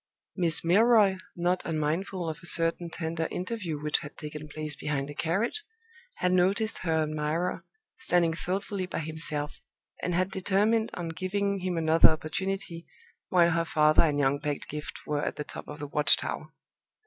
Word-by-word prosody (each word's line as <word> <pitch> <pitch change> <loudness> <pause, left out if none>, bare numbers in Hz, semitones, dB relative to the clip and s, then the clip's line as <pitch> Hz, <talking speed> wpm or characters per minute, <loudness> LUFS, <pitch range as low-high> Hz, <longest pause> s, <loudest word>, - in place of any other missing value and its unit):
Miss 170 -4 +2
Milroy 205 +1 +5 0.2
(not 175 +1 0
unmindful 165 +3 -2
of 160 -1 -4
a 175 - -4
certain 170 0 +2
tender 165 0 -3
interview 180 -5 -4
which 150 0 +1
had 145 - -10
taken 150 0 -7
place 150 0 -1
behind 145 -1 -3
a - - -7
carriage) 195 - 0 0.5
had 180 - 0
noticed 195 +5 +2
her 160 -3 +1
admirer 155 +3 -2 0.4
standing 175 -9 +2
thoughtfully 190 +2 -3
by - - -5
himself, 155 -1 -2 0.4
and 180 - -1
had 185 +2 +1
determined 210 +4 +2
on 170 -2 -4
giving 195 +3 -1
him 180 -1 -2
another 160 0 +6
opportunity, 170 +2 -3 0.4
while 170 -2 +4
her 170 0 +1
father 155 -1 +4
and 150 -3 +2
young 140 0 +2
Pedgift 150 +1 -5
were 145 -1 -1
at - - -2
the 150 - -4
top - - -9
of - - -7
the 145 - -5
watch 150 +1 +4
tower. - - -4
170 Hz, 160 wpm, -28 LUFS, 155-185 Hz, 0.5 s, another